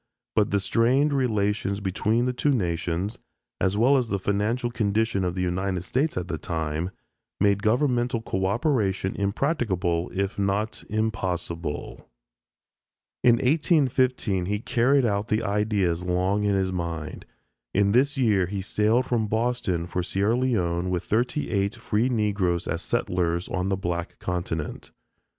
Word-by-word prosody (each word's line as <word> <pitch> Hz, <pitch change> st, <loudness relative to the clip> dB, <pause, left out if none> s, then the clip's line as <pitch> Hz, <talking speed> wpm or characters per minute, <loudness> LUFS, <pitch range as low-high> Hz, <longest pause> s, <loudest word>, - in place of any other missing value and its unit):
But 105 Hz, -2 st, +3 dB
the 100 Hz, -, +2 dB
strained 130 Hz, +8 st, +2 dB
relations 105 Hz, -6 st, 0 dB
between 105 Hz, +4 st, 0 dB
the 125 Hz, -, 0 dB
two 135 Hz, +4 st, 0 dB
nations, 90 Hz, -3 st, -1 dB, 0.4 s
as 95 Hz, +1 st, +1 dB
well 130 Hz, +6 st, +5 dB
as 125 Hz, -3 st, 0 dB
the 100 Hz, -, 0 dB
financial 105 Hz, +6 st, -1 dB
condition 110 Hz, -3 st, 0 dB
of 90 Hz, -1 st, -1 dB
the 90 Hz, -, -1 dB
United 90 Hz, 0 st, -1 dB
States 135 Hz, -, 0 dB
at 90 Hz, 0 st, -2 dB
the 80 Hz, -4 st, -4 dB
time, 80 Hz, +1 st, -2 dB, 0.5 s
made 100 Hz, 0 st, +3 dB
governmental 120 Hz, +1 st, +1 dB
coöperation 100 Hz, -1 st, 0 dB
impracticable 100 Hz, -, 0 dB
if 100 Hz, +1 st, -2 dB
not 100 Hz, +2 st, -1 dB
impossible. 90 Hz, -7 st, -3 dB, 1.1 s
In 120 Hz, -1 st, +6 dB
1815 130 Hz, -, +2 dB
he 105 Hz, +1 st, 0 dB
carried 125 Hz, +5 st, +2 dB
out 105 Hz, -1 st, 0 dB
the 110 Hz, 0 st, 0 dB
ideas 100 Hz, -4 st, 0 dB
long 95 Hz, +3 st, +1 dB
in 100 Hz, -1 st, +2 dB
his 95 Hz, -1 st, 0 dB
mind. 85 Hz, -3 st, -4 dB, 0.4 s
In 100 Hz, 0 st, +2 dB
this 140 Hz, +5 st, +3 dB
year 105 Hz, -8 st, +3 dB
he 95 Hz, +1 st, -4 dB
sailed 110 Hz, +5 st, +2 dB
from 115 Hz, -4 st, 0 dB
Boston 110 Hz, -6 st, 0 dB
for 90 Hz, +1 st, -2 dB
Sierra 100 Hz, +5 st, +1 dB
Leone 90 Hz, -9 st, 0 dB
with 90 Hz, -2 st, -1 dB
thirty 125 Hz, +7 st, 0 dB
eight 100 Hz, 0 st, 0 dB
free 110 Hz, +5 st, 0 dB
Negroes 100 Hz, -7 st, 0 dB
as -, -, -2 dB
settlers 85 Hz, -1 st, -1 dB
on 90 Hz, +1 st, -1 dB
the 95 Hz, -, 0 dB
Black 85 Hz, -2 st, -3 dB
Continent. 85 Hz, -3 st, -4 dB
100 Hz, 140 wpm, -25 LUFS, 90-120 Hz, 1.1 s, In